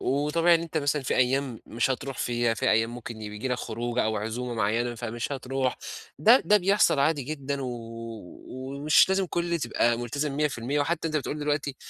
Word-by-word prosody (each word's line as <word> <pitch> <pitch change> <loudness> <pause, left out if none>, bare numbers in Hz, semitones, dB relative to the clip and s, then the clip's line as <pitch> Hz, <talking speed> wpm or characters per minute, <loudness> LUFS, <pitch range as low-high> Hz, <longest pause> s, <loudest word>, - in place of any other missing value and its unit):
وطبيعي 150 +5 +3
إن 165 - +2
أنت 165 -1 -6
مثلًا 145 0 0
في 130 - -1
أيّام 130 -1 +1
مش 115 +3 0
هترُوح 130 0 -3
فيها، 120 -1 +1
في - - +1
أيّام 115 +1 +2
ممكن 115 -2 -8
ي 105 - -5
بييجي 105 +5 -5
لك 125 - 0
خروجة 120 +1 -2
أو 110 0 0
عزومة 115 +4 -3
معيّنة 115 +3 0
فمش 120 +2 -4
هترُوح، 135 -1 -2 0.4
ده 230 - +6
ده 210 - +5
بيحصل 195 -5 +3
عادي 145 0 +2
جدًا، 140 0 -4
و 130 - -3 0.8
ومش 140 +5 +2
لازم 190 0 +1
كُلّ 170 0 -1
تبقى 120 -3 +1
ملتزم 140 +5 -2
100%، 145 -1 0
وحتّى 165 +2 0
أنت 155 - -1
بتقول 150 +1 -3
دلوقتي 145 -2 -1
135 Hz, 185 wpm, -27 LUFS, 120-150 Hz, 0.8 s, ده